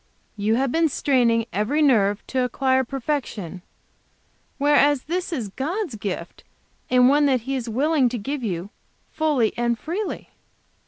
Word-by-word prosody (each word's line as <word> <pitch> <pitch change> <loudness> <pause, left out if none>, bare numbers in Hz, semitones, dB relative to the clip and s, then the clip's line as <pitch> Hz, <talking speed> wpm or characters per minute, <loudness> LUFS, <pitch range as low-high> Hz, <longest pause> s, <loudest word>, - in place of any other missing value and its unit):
You 215 +1 +1
have 265 +1 0
been 325 +1 +2
straining 240 -5 +2
every 215 +10 0
nerve 215 -9 +3
to 260 -1 -1
acquire 260 +1 +1
perfection, 240 - -4 1.0
whereas 290 -1 +3
this 360 +3 -3
is 245 -11 -3
God's 320 - -3
gift, 190 -5 -6 0.5
and 250 0 +5
one 290 +2 +4
that 260 -3 +2
He 270 +4 -3
is 245 -3 -4
willing 275 +2 +2
to 245 - -3
give 275 +6 -4
you, 190 -3 -4 0.4
fully 295 -8 +1
and 235 -1 0
freely." 370 - -5
260 Hz, 145 wpm, -23 LUFS, 225-290 Hz, 1.0 s, and